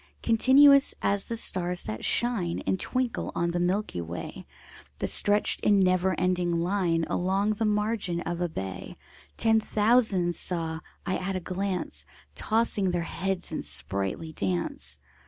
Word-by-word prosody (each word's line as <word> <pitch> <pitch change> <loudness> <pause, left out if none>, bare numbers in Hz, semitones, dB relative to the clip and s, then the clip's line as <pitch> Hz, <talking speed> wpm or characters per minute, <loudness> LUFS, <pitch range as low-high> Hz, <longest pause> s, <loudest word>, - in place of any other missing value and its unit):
Continuous 275 +4 +6
as 200 -1 +1
the 230 - -4
stars 180 -4 -2
that 110 +1 -5
shine 220 -9 +1
And 190 - 0
twinkle 255 +2 -2
on 170 0 0
the 175 - -1
milky 180 - -1
way, 85 +1 -7 0.5
The - - -2
stretched 205 0 +2
in 205 -1 +3
never 185 -1 +2
ending 180 -2 +1
line 170 -2 +1
Along 195 +3 +1
the 215 +1 -1
margin 210 -4 0
of 175 0 -4
a 175 - 0
bay: 95 - -6 0.4
Ten 225 -1 +3
thousand 210 -5 +2
saw 165 -2 -3 0.3
I 190 - 0
at 190 +1 -3
a - - 0
glance, 185 +1 -4 0.3
Tossing 220 -3 0
their 175 -1 -1
heads 185 +1 -3
in 160 - -3
sprightly 100 - -3
dance. 85 - -3
185 Hz, 145 wpm, -27 LUFS, 170-210 Hz, 0.5 s, Continuous